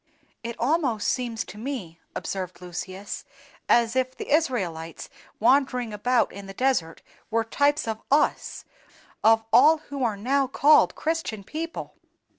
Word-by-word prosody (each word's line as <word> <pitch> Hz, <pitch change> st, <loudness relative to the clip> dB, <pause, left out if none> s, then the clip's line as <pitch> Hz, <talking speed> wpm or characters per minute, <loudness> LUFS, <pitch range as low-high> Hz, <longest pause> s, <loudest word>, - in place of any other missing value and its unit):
"It 235 Hz, 0 st, -5 dB
almost 255 Hz, -4 st, +1 dB
seems 235 Hz, -3 st, -2 dB
to 210 Hz, -, -11 dB
me," 215 Hz, -10 st, -5 dB, 0.2 s
observed 185 Hz, -2 st, -4 dB
Lucius, 185 Hz, +2 st, -6 dB, 0.5 s
"as 235 Hz, 0 st, +4 dB
if 255 Hz, 0 st, 0 dB
the -, -, -6 dB
Israelites 185 Hz, -, -1 dB, 0.3 s
wandering 250 Hz, -2 st, +2 dB
about 245 Hz, +4 st, +1 dB
in 200 Hz, 0 st, -9 dB
the 195 Hz, -, -9 dB
desert 250 Hz, -11 st, 0 dB, 0.3 s
were 225 Hz, 0 st, +1 dB
types 285 Hz, +4 st, +1 dB
of 220 Hz, 0 st, -3 dB
us—of 225 Hz, -5 st, 0 dB
all 320 Hz, +1 st, +7 dB, 0.2 s
who 275 Hz, -2 st, -2 dB
are 220 Hz, -4 st, 0 dB
now 270 Hz, +6 st, +1 dB
called 295 Hz, +3 st, +4 dB
Christian 315 Hz, -10 st, -2 dB
people." 320 Hz, -, -6 dB
235 Hz, 130 wpm, -25 LUFS, 205-275 Hz, 0.5 s, all